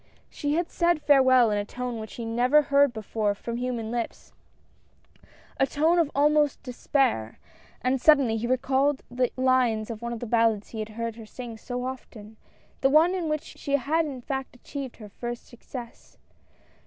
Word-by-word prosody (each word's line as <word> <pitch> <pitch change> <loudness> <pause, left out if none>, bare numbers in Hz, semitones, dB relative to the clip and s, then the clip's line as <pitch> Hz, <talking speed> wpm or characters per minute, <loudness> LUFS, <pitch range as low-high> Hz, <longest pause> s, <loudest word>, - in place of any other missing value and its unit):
She 290 0 -1
had 345 +1 -1
said 345 -2 +2
farewell 260 -5 +5
in 205 - +1
a - - -1
tone 245 +2 -5
which 220 -1 -8
he 235 - -6
had 225 - -4
never 250 +6 +4
heard 280 -1 +4
before 215 -2 -2
from 235 +3 -5
human 240 -3 -3
lips 235 -1 -5 0.6
— - - -29
a 270 - +4
tone 320 +5 +2
of 325 -4 +2
almost 295 0 +3
despair 250 - 0 0.2
— - - -28
and 255 0 +1
suddenly 275 -7 +5
he 225 +2 -2
recalled 265 +2 +1
the 250 0 0
lines 250 -4 +2
of 220 -1 -7
one 235 0 -4
of 235 - -4
the 240 - -5
ballads 225 -2 +1
he 225 - -7
had 215 0 -4
heard 230 +1 -5
her 225 -2 -10
sing 240 0 -8
so 245 +3 -5
often, 220 -4 -8 0.4
the 270 - +4
one 320 +5 +5
in 350 -4 -2
which 305 -1 -1
she 280 - -6
had 310 +4 +1
in 265 -4 -6
fact 265 0 -4
achieved 270 +1 -7
her 210 -3 -11
first 240 +3 -6
success. 240 0 -11
250 Hz, 190 wpm, -26 LUFS, 230-280 Hz, 0.6 s, farewell